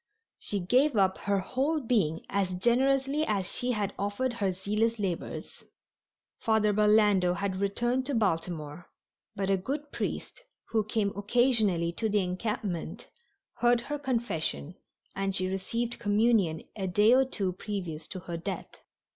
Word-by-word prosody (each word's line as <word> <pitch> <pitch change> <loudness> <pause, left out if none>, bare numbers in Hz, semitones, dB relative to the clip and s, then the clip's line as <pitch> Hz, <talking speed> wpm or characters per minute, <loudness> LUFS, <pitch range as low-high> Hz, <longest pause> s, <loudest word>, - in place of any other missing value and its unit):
She 205 - -3
gave 250 +10 +3
up 190 -1 +3
her 200 -1 0
whole 275 - 0
being 210 - 0
as 195 -2 -1
generously 270 +7 +2
as 200 -9 -1
she 250 0 -1
had 205 -3 -2
offered 205 +6 -1
her 200 -5 0
zealous 210 +5 0
labors. 190 -5 -4 0.8
Father 220 -2 +2
Burlando 210 -3 +4
had 195 0 -2
returned 240 +6 0
to 285 - -1
Baltimore, 165 -5 -2 0.5
but 195 -1 0
a 195 - +3
good 285 +9 -4
priest, - - -4 0.3
who 220 -2 +2
came 210 -1 -1
occasionally 205 -5 +2
to 220 +5 -2
the 205 -1 +2
encampment, 185 -1 -3 0.5
heard 240 0 +4
her 295 +4 -4
confession, 230 - -2 0.4
and 195 0 -1
she 185 - 0
received 230 +6 -2
communion 205 -6 +2
a 195 -3 -3
day 210 +5 +5
or 265 +1 +6
two 200 -8 -2
previous 175 -6 -5
to 185 - -7
her 170 -1 -5
death. 165 - -5
205 Hz, 145 wpm, -29 LUFS, 185-240 Hz, 0.8 s, or